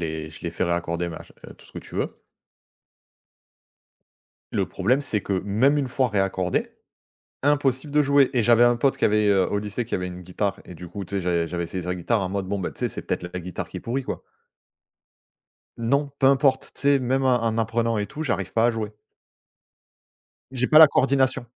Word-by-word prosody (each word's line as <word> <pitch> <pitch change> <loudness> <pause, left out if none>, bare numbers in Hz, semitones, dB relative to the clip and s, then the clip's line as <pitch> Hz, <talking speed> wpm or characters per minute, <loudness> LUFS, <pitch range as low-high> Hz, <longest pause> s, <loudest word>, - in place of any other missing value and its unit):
l'ai 80 -1 -4
je 80 - -13
l'ai 85 - -3
fait 85 - -2
réaccorder, 85 0 -1
mach 80 - -9 0.2
heu, - - -12
tout - - -19
ce - - -19
que - - -6
tu - - -13
veux. - - -3 2.3
Le - - 0
problème, 125 +9 0
c'est 110 -6 0
que 95 -1 -2
même 120 +9 +3
une 140 -3 -1
fois 130 0 +1
réaccordée, 95 -3 0 0.8
impossible 140 -1 +1
de 150 - +4
jouer! 140 -1 +4
Et 120 -3 +2
j'avais 120 +1 +5
un 120 0 +4
pote 130 +3 +1
qui - - 0
avait, 105 0 +3
heu 95 -2 +3
au 105 - -1
lycée, 105 +3 -3
qui 115 - -5
avait 90 0 -2
une 90 0 -8
guitare 95 +2 -3
et 90 - -11
du 90 +2 -10
coup, 100 +3 -6
tu 100 - -8
sais, - - 0
j'avais 85 -1 0
j'avais 85 +1 -3
essayé 90 +1 -5
sa 90 0 -2
guitare 100 +5 0
en 95 - -2
mode, 95 0 -3
bon 100 - -1
bah, 95 - -3
tu - - -15
sais, - - 0
c'est - - -5
peut-être - - -3
le 90 - -6
la 90 - -4
guitare 90 0 -6
qui - - -9
est - - -5
pourrie, 130 +4 -2
quoi. - - -5 1.5
Non, 140 +5 0
peu 135 - +3
importe. 135 -1 +3
Tu - - -6
sais, 140 0 +4
même 130 +1 0
en 115 -3 +2
apprenant 115 0 0
et 105 - -1
tout, 155 - -6
j'arrive 100 - -2
pas 115 +1 +4
à - - +4
jouer. 110 -2 -4 1.6
J'ai 125 -1 0
pas 155 - +6
la 160 -1 +10
coordination. 130 -2 +2
110 Hz, 220 wpm, -24 LUFS, 90-130 Hz, 2.3 s, la